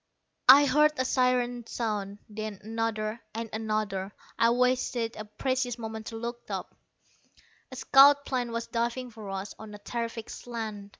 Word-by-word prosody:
I 280 +2 +10
heard 300 +3 +4
a 260 - +1
siren 245 -2 +1
sound, 205 -4 -3
then 215 -2 -6
another; 225 0 -2
and 230 -1 -4
another. 215 -3 -2 0.3
I 230 - +5
wasted 245 -1 +1
a 215 - -6
precious 250 +3 -2
moment 220 -1 -6
to 225 - -6
look 235 +1 -6
up. - - -5 1.0
A - - -7
scout 280 +2 +6
plane 245 -3 -2
was 230 0 -3
diving 240 +2 -2
for 215 -3 -9
us, 195 +1 -5
on 215 -1 -9
a - - -8
terrific 230 +1 -5
slant. 220 -4 -6
230 Hz, 155 wpm, -28 LUFS, 215-250 Hz, 1.0 s, I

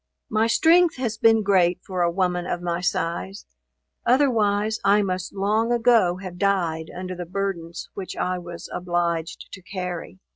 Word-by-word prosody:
My 220 +1 +2
strength 330 +7 +4
has 230 -4 -3
been 225 -1 +5
great 180 -3 +3
for 185 -2 -3
a 170 - +3
woman 180 0 -1
of 175 - -2
my 175 0 -2
size, 175 +3 -2 0.6
otherwise 220 -5 +2
I 205 +1 +4
must 185 -1 -3
long 215 +4 +1
ago 230 -7 +3
have 185 -2 -8
died 170 -5 0
under 185 +1 -6
the 175 -1 -6
burdens 180 -3 -4
which 190 -2 -6
I 180 0 -1
was 175 -1 -8
obliged 175 -2 -2
to 190 - -9
carry. 180 -1 -6
185 Hz, 155 wpm, -24 LUFS, 175-215 Hz, 0.6 s, been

